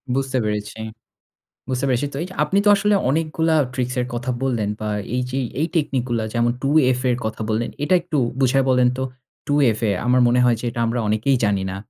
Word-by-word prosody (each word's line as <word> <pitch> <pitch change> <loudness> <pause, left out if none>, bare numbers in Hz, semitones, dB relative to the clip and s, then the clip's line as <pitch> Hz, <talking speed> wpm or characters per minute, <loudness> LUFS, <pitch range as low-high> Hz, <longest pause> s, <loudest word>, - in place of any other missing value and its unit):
বুঝতে 135 -1 -1
পেরেছি। 105 +1 -3 0.9
বুঝতে 130 +1 -1
পেরেছি, 130 +2 +1
তো - - -6
এই - - -3
যে - - -10
আপনি 195 - +1
তো - - +4
আসলে 205 +1 +2 0.2
অনেকগুলা 160 +2 0 0.2
ট্রিক্সের 125 -1 -1
কথা 120 +2 -3
বললেন, 115 -6 0
বা 110 - -3 0.3
এই 125 - 0
যে 135 - -2 0.2
এই 160 - +2
টেকনিক 140 -6 0
গুলা 115 -2 0
যেমন 120 0 +2
2FA 130 -3 +2
এর 120 - -2
কথা 110 0 -4
বললেন, 110 +2 -1
এটা 185 - +2
একটু 165 -4 -3 0.2
বুঝায় 135 +1 +3
বলেন 125 -1 +4
তো? 130 - -1 0.5
2FA 120 -7 +2 0.2
আমার 125 +1 +4
মনে 125 +1 +3
হয় 120 -2 +3
যে - - -8
এটা 115 - -5
আমরা 120 +2 -1
অনেকেই 110 +6 +2
জানি 100 -2 +1
না। 95 - -5
125 Hz, 200 wpm, -21 LUFS, 115-140 Hz, 0.9 s, তো